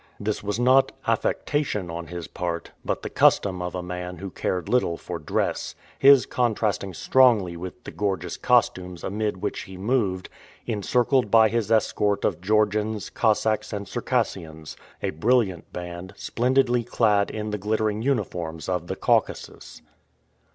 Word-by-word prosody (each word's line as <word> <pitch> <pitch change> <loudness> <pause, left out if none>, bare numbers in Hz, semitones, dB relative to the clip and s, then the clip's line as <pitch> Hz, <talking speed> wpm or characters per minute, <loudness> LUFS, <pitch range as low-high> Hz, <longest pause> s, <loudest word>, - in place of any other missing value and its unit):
This 105 +1 -2
was 105 +2 -2
not 130 +2 +4
affectation 105 - -1
on 85 0 -6
his 85 -1 -6
part, 85 -2 -4
but - - -2
the - - -4
custom 95 -3 +3
of 90 0 -4
a 90 - -3
man 90 0 -6
who 95 +2 -7
cared 90 -1 -2
little 120 -9 +1
for 85 -2 -6
dress, 75 - -2 0.2
his 135 -1 +7
contrasting 110 -6 -1
strongly 115 -10 +4
with 90 +7 -8
the - - -8
gorgeous 95 -4 -2
costumes 95 -8 +1
amid 105 -1 -2
which - - -2
he 95 - -9
moved, 100 -3 0 0.4
encircled 120 +2 +1
by 110 0 +6
his 115 -1 -1
escort 105 -2 +1
of - - -1
Georgians, 105 +1 0
Cossacks, 110 -1 +1
and 100 -2 -4
Circassians 95 -10 -3 0.3
a - - 0
brilliant 95 0 +1
band, 90 +2 -7
splendidly 125 0 +1
clad 105 -3 +2
in 105 0 -4
the 105 - -3
glittering 110 +1 0
uniforms 85 -11 -2
of 90 -2 -2
the - - -3
Caucasus. - - -1
105 Hz, 145 wpm, -25 LUFS, 90-115 Hz, 0.4 s, his